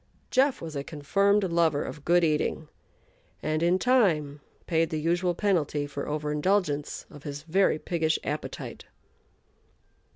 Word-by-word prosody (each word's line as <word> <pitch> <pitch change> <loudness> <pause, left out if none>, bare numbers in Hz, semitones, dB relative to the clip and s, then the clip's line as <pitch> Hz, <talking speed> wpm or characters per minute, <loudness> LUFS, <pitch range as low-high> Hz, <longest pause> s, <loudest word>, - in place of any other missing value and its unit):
"Jeff" 265 -3 +2
was 160 -2 -6
a 140 - -2
confirmed 200 +8 +1
lover 170 -5 +2
of 150 - -8
good 175 +2 +4
eating, 155 0 0 0.8
and 155 0 0
in 175 +2 +3
time 170 - +2 0.2
paid 165 -1 +1
the 155 - -2
usual 175 +3 +1
penalty 165 -7 0
for 145 0 -5
over 150 0 -2
indulgence 150 -2 0
of 145 - -12
his 145 -1 -6
very 175 0 +2
piggish 160 -1 0
appetite. 150 +1 -5
160 Hz, 135 wpm, -27 LUFS, 150-185 Hz, 0.8 s, good